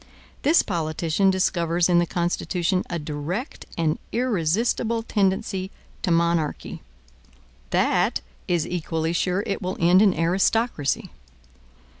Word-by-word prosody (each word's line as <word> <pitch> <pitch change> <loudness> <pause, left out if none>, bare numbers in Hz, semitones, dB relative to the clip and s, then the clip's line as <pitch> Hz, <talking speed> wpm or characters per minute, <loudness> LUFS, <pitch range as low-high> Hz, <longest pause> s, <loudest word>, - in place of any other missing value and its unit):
This 315 +4 +4
politician 165 +1 0
discovers 175 -2 +1
in 175 -1 +4
the 175 - +1
Constitution 175 +1 0
a 175 - -2
direct 155 - -5
and 160 -1 0
irresistible 230 +1 0
tendency 190 -3 0 0.3
to - - -1
monarchy; 170 -2 0 0.9
that - - +2 0.3
is 175 -3 +1
equally 165 -1 -2
sure 180 +3 0
it 200 - -2
will 185 +1 -3
end 180 +2 +5
in 200 -5 +4
aristocracy. 185 - +1
175 Hz, 110 wpm, -24 LUFS, 165-195 Hz, 0.9 s, end